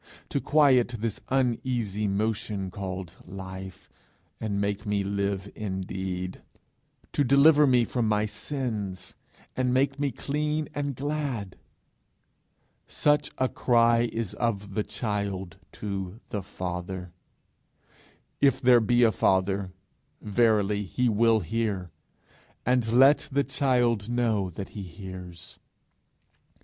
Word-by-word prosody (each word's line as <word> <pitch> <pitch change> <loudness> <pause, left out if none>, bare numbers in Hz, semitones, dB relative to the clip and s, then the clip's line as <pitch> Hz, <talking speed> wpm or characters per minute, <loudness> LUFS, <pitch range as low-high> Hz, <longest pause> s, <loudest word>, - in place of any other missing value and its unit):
to 140 - -1
quiet 130 -5 +4
this 110 -1 -3
uneasy 120 -5 0
motion 100 -1 -1
called 95 -2 -6
life, 95 0 -9 0.5
and 100 -2 -2
make 100 0 -1
me 105 -2 0
live 100 0 -2
indeed? 95 -2 -4 0.7
to 145 - +2
deliver 145 +3 +6
me 125 -2 +4
from 120 -2 -1
my 105 0 +2
sins, 105 -5 -4 0.4
and 130 -1 +1
make 135 +1 +1
me 145 -1 +1
clean 150 +4 -2
and 145 -2 -2
glad? 135 -8 -3 1.3
Such 150 -1 +2
a 130 - +2
cry 120 -1 +3
is 115 -4 -3
of 105 -4 -2
the 105 - 0
child 100 -6 -3 0.2
to 100 0 -5
the 105 - -3
Father: 90 -1 -5 1.3
if 135 -2 +4
there 125 -1 +6
be 120 +2 +3
a 115 - +5
Father, 95 0 +1 0.5
verily 105 -1 +2
he 120 +5 0
will 110 0 +3
hear, 100 -2 -2 0.7
and 125 -2 +2
let 135 +5 +5
the 140 +1 +2
child 125 -5 +1
know 115 -6 +1
that 95 +3 -7
he 105 - -7
hears! 90 -2 -9
105 Hz, 115 wpm, -27 LUFS, 95-125 Hz, 1.3 s, deliver